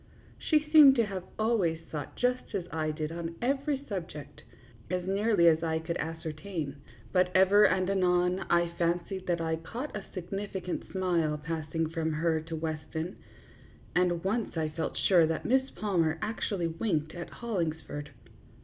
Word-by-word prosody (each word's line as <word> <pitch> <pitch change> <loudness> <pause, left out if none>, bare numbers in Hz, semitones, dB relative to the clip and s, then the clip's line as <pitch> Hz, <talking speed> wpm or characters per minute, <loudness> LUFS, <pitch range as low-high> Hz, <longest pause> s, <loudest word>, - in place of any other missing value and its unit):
She 305 -1 +2
seemed 295 -4 +9
to 230 -3 +3
have 190 -3 -5
always 215 -8 +1
thought 150 -3 -5
just 250 -3 -1
as 185 -3 -2
I 155 -1 -1
did 155 0 -3
on 165 0 -5
every 275 +2 0
subject, 165 -8 -6 0.5
as 180 0 -1
nearly 200 -2 +3
as 160 -1 +5
I 160 -1 0
could 160 +1 -3
ascertain; 160 -1 -4 0.4
but 180 0 +4
ever 195 +2 +7
and 185 -1 +1
anon 180 -1 +2
I 175 0 +3
fancied 175 +2 -1
that 175 -1 +1
I 160 -1 -1
caught 240 - -6
a 210 - -4
significant 190 0 -4
smile 170 -5 +1
passing 160 +1 -2
from 160 0 -2
her 160 0 +1
to 165 +1 -6
Weston, 160 +2 -4 0.8
and 175 -1 +2
once 210 -1 -1
I 155 -1 0
felt 160 +1 -4
sure 175 -4 +5
that 160 - -2
Miss 265 +2 +2
Palmer 170 -7 0
actually 205 -4 -2
winked 160 -2 -1
at 175 -1 -6
Hollingsford. 160 -9 -3
175 Hz, 155 wpm, -30 LUFS, 160-200 Hz, 0.8 s, seemed